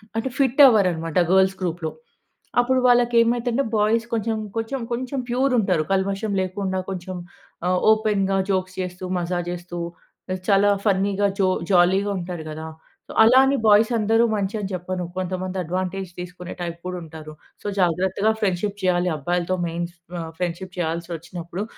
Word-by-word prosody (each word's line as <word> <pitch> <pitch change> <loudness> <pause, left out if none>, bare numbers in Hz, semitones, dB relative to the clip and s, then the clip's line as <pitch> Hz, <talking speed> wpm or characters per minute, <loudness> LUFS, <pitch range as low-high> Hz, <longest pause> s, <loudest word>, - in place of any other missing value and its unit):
అంటే 225 +4 -1
fit 270 +1 +3
అవ్వరనమాట 180 -8 +2 0.2
girls 190 0 +4
గ్రూప్‌లో. 170 -2 -2 0.7
అప్పుడు 255 +1 +3
వాళ్ళకి 240 -1 +4
ఏమైతంటే 240 +3 +1
బాయ్స్ 225 +2 +2
కొంచెం, 225 0 -1 0.2
కొంచెం 225 +4 -2
కొంచెం 255 +3 -3
ప్యూర్‌ 260 +2 +1
ఉంటారు 185 -6 +1
కల్మషం 195 +2 -1
లేకుండా 190 0 -2
కొంచెం 185 0 -5 0.5
ఆహ్, 180 0 +2
ఓపెన్‌గా 205 -3 +2
జోక్స్ 185 0 -2
చేస్తూ, 180 0 -6 0.2
మజా 175 0 -1
జేస్తూ 175 0 -6 0.7
చాలా 200 0 +4
ఫన్నీగా 200 0 +1
జో 190 - +4 0.2
జాలీగా 190 +3 +4
ఉంటారు 175 -2 -5
గదా! 155 +1 -6 0.6
అలా 245 +4 +7
అని 275 +1 +2
బాయ్స్ 215 +1 +6
అందరూ 225 +1 +3
మంచి 200 0 -2
అని 195 - -4
చెప్పను. 180 0 -3
కొంతమంది 185 0 -3
అడ్వాంటేజ్ 185 +2 -3
తీసుకునే 180 0 -7
టైప్ 170 -1 -4
కూడా 180 0 -3
ఉంటారు. 155 -1 -10 0.3
సో - - -23
జాగ్రత్తగా 190 +4 +2
ఫ్రెండ్‌షిప్ 200 0 -1
చేయాలి 180 0 +2
అబ్బాయిలతో 175 +4 -1
మెయిన్ 170 +1 -2
ఫ్ 175 0 -20
ఆహ్, 160 -1 -6
ఫ్రెండ్షిప్ 180 +1 -4
చేయాల్సి 170 0 -2
వచ్చినప్పుడు. 175 +3 -6
190 Hz, 145 wpm, -23 LUFS, 175-215 Hz, 0.7 s, అలా